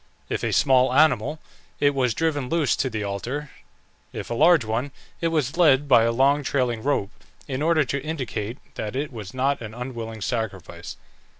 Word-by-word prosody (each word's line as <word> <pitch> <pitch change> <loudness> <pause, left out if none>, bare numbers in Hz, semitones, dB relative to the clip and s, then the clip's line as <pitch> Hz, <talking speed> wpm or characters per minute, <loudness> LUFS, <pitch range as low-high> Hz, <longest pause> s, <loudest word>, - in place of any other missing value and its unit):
If - - -2
a - - 0
small 130 -2 +4
animal, 155 0 +3 0.4
it 145 0 +3
was 125 -4 +1
driven 145 -5 -1
loose 165 -4 +2
to 130 - -1
the 110 -3 -3
altar; 125 +9 -4 0.6
if - - -7
a - - +1
large 155 0 +5
one, 115 +6 -2 0.3
it 165 - +2
was 155 -2 -1
led 145 -5 +4
by 120 -4 +6
a 115 - +2
long 135 +4 +3
trailing 125 -5 0
rope, 110 -6 0 0.4
in 135 0 -3
order 160 -1 +3
to 140 +2 -2
indicate 125 -7 -4 0.2
that 105 +1 -5
it 140 0 -3
was 105 -1 -8
not 135 +1 0
an 110 -1 -7
unwilling 115 -3 -6
sacrifice. 105 - -4
130 Hz, 180 wpm, -24 LUFS, 115-145 Hz, 0.6 s, by